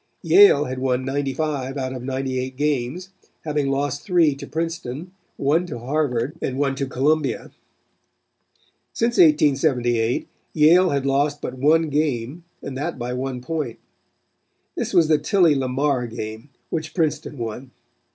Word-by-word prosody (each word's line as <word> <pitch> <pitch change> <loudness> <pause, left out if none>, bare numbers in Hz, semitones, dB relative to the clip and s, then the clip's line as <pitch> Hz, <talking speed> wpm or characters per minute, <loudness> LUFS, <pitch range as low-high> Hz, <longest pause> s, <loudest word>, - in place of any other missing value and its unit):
Yale 405 +1 +6
had 130 0 -4
won 130 -1 0
95 140 0 -2
out 130 -1 -3
of 130 - -6
98 130 0 -3
games, 150 +5 -1 0.3
having 150 -3 -1
lost 140 +1 -1
three 175 -6 +3
to 140 - -9
Princeton, 165 -1 -4 0.3
one 160 +6 +1
to 150 - -6
Harvard 135 +2 -1
and 130 - -2
one 140 -1 +1
to 135 0 -3
Columbia. 140 +2 0 1.4
Since 235 +1 0
1878 135 -7 +3 0.3
Yale 170 +4 +5
had 140 -1 -1
lost 145 +2 +1
but - - -5
one 155 +5 +2
game 145 +1 -2 0.2
and 135 - -6
that 135 +1 -3
by 125 0 -4
one 130 0 -4
point. 140 -3 -4 1.0
This - - -3
was 165 -2 +4
the 155 -1 +3
Tilly 170 0 +3
Lamar 135 -1 0
game, 110 +3 -7 0.2
which 155 -1 -4
Princeton 155 -3 -1
won. 120 +2 -5
140 Hz, 140 wpm, -22 LUFS, 130-155 Hz, 1.4 s, Yale